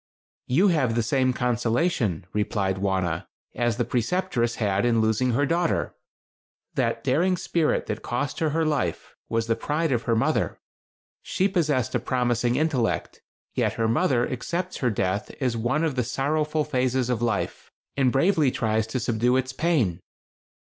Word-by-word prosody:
"You 175 Hz, +11 st, +4 dB
have 135 Hz, -9 st, +1 dB
the 120 Hz, -, +1 dB
same 130 Hz, +2 st, +2 dB
consolation," 120 Hz, -, 0 dB
replied 100 Hz, -2 st, 0 dB
Wauna, 95 Hz, -4 st, -1 dB, 0.3 s
"as 120 Hz, -2 st, 0 dB
the 120 Hz, -, 0 dB
Preceptress 120 Hz, 0 st, 0 dB
had 100 Hz, -3 st, 0 dB
in 120 Hz, -1 st, +3 dB
losing 110 Hz, +3 st, +2 dB
her 145 Hz, +5 st, +2 dB
daughter. 170 Hz, +3 st, 0 dB, 0.8 s
That -, -, -1 dB
daring 180 Hz, +4 st, +2 dB
spirit 170 Hz, -3 st, 0 dB
that 105 Hz, -, -4 dB
cost 125 Hz, +3 st, -3 dB
her 160 Hz, -, +1 dB
her 160 Hz, +2 st, 0 dB
life, 135 Hz, -, -1 dB, 0.2 s
was 115 Hz, 0 st, 0 dB
the 115 Hz, 0 st, +1 dB
pride 155 Hz, +4 st, -1 dB
of 120 Hz, -3 st, +1 dB
her 115 Hz, -, +2 dB
mother. 110 Hz, -, 0 dB, 0.6 s
She 190 Hz, -, 0 dB
possessed 150 Hz, -, 0 dB
a 125 Hz, -, +2 dB
promising 120 Hz, 0 st, 0 dB
intellect, 140 Hz, -5 st, -1 dB, 0.3 s
yet -, -, +1 dB
her 115 Hz, -1 st, 0 dB
mother 120 Hz, 0 st, +2 dB
accepts 175 Hz, +8 st, -3 dB
her 125 Hz, -, +1 dB
death 100 Hz, 0 st, -1 dB
as 125 Hz, -4 st, 0 dB
one 120 Hz, +8 st, 0 dB
of 160 Hz, -3 st, +1 dB
the 125 Hz, -1 st, 0 dB
sorrowful 150 Hz, +5 st, 0 dB
phases 130 Hz, -3 st, 0 dB
of 120 Hz, -2 st, -1 dB
life, 115 Hz, -5 st, -2 dB, 0.3 s
and 130 Hz, -3 st, +3 dB
bravely 155 Hz, +1 st, +3 dB
tries 110 Hz, -3 st, 0 dB
to 130 Hz, +3 st, -2 dB
subdue 120 Hz, +2 st, +1 dB
its 130 Hz, 0 st, -2 dB
pain. 130 Hz, -, +1 dB
125 Hz, 160 wpm, -25 LUFS, 115-150 Hz, 0.8 s, You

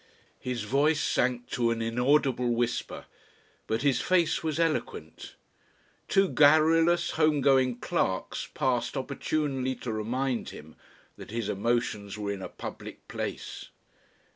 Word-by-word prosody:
His 125 Hz, -3 st, -3 dB
voice 145 Hz, +7 st, +2 dB
sank 125 Hz, -3 st, 0 dB
to 120 Hz, -1 st, +1 dB
an 115 Hz, 0 st, -1 dB
inaudible 125 Hz, +2 st, +2 dB
whisper. 120 Hz, 0 st, -2 dB, 0.6 s
But 110 Hz, +4 st, -1 dB
his 140 Hz, -3 st, +2 dB
face 175 Hz, -3 st, +2 dB
was 160 Hz, -1 st, -2 dB
eloquent. 165 Hz, -2 st, -2 dB, 0.7 s
Two 195 Hz, -1 st, +3 dB
garrulous, 160 Hz, +3 st, +4 dB
home 155 Hz, -2 st, +2 dB
going 130 Hz, -3 st, +3 dB
clerks 110 Hz, -, -2 dB
passed 125 Hz, 0 st, 0 dB
opportunely 135 Hz, -1 st, -2 dB
to 120 Hz, -, -5 dB
remind 120 Hz, +4 st, -2 dB
him 80 Hz, +1 st, -12 dB, 0.4 s
that -, -, -10 dB
his 115 Hz, -1 st, -3 dB
emotions 105 Hz, -1 st, -1 dB
were 105 Hz, -1 st, -3 dB
in 100 Hz, -1 st, -5 dB
a -, -, -6 dB
public -, -, -9 dB
place. -, -, -5 dB
130 Hz, 125 wpm, -28 LUFS, 115-150 Hz, 0.7 s, garrulous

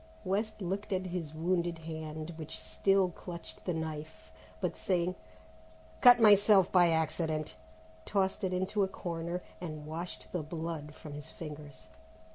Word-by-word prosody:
West 210 Hz, +2 st, -1 dB
looked 200 Hz, +4 st, -3 dB
at 185 Hz, -1 st, 0 dB
his 175 Hz, -4 st, -3 dB
wounded 170 Hz, +1 st, 0 dB
hand, 160 Hz, 0 st, -6 dB
which 160 Hz, -1 st, -6 dB
still 195 Hz, -2 st, +2 dB
clutched 170 Hz, -1 st, -9 dB
the 180 Hz, -, 0 dB
knife, 160 Hz, -1 st, -5 dB, 0.3 s
but -, -, -1 dB
saying, 180 Hz, -1 st, 0 dB, 0.9 s
"Cut 245 Hz, -1 st, +9 dB
myself 205 Hz, -3 st, +7 dB
by 175 Hz, -2 st, +6 dB
accident," 160 Hz, -1 st, 0 dB, 0.5 s
tossed 190 Hz, -, 0 dB
it 185 Hz, -, +1 dB
into 185 Hz, +3 st, 0 dB
a 195 Hz, -, +4 dB
corner 170 Hz, -1 st, -4 dB, 0.2 s
and 155 Hz, -4 st, -5 dB
washed 165 Hz, +3 st, -5 dB
the 175 Hz, -, -1 dB
blood 160 Hz, -1 st, -5 dB
from 150 Hz, -, -9 dB
his 150 Hz, +2 st, -8 dB
fingers. 150 Hz, -5 st, -9 dB
170 Hz, 140 wpm, -32 LUFS, 155-185 Hz, 0.9 s, Cut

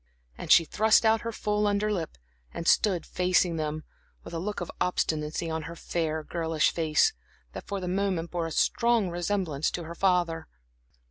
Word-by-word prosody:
And -, -, -5 dB
she 165 Hz, -, +7 dB
thrust 220 Hz, +7 st, +3 dB
out 220 Hz, 0 st, +4 dB
her 230 Hz, -, -4 dB
full 210 Hz, -1 st, 0 dB
under 205 Hz, +1 st, +1 dB
lip, 165 Hz, -, -4 dB, 0.3 s
and 170 Hz, -, -5 dB
stood 185 Hz, -6 st, +3 dB
facing 180 Hz, -2 st, +1 dB
them, 155 Hz, 0 st, -3 dB, 0.4 s
with -, -, -10 dB
a 165 Hz, -, -2 dB
look 205 Hz, +4 st, -3 dB
of 175 Hz, -, -5 dB
obstinacy 155 Hz, -2 st, -1 dB
on 160 Hz, 0 st, -2 dB
her 170 Hz, -, -8 dB
fair, 160 Hz, -2 st, -2 dB
girlish 160 Hz, -1 st, 0 dB
face, 155 Hz, -2 st, +2 dB, 0.4 s
that -, -, -8 dB
for 200 Hz, -, -3 dB
the 180 Hz, -, -5 dB
moment 185 Hz, -3 st, -1 dB
bore 170 Hz, -2 st, -2 dB
a -, -, -7 dB
strong 230 Hz, +2 st, +2 dB
resemblance 175 Hz, -4 st, -1 dB
to 175 Hz, -, -5 dB
her 165 Hz, +1 st, -7 dB
father. 175 Hz, -3 st, +1 dB
175 Hz, 180 wpm, -27 LUFS, 160-200 Hz, 0.4 s, she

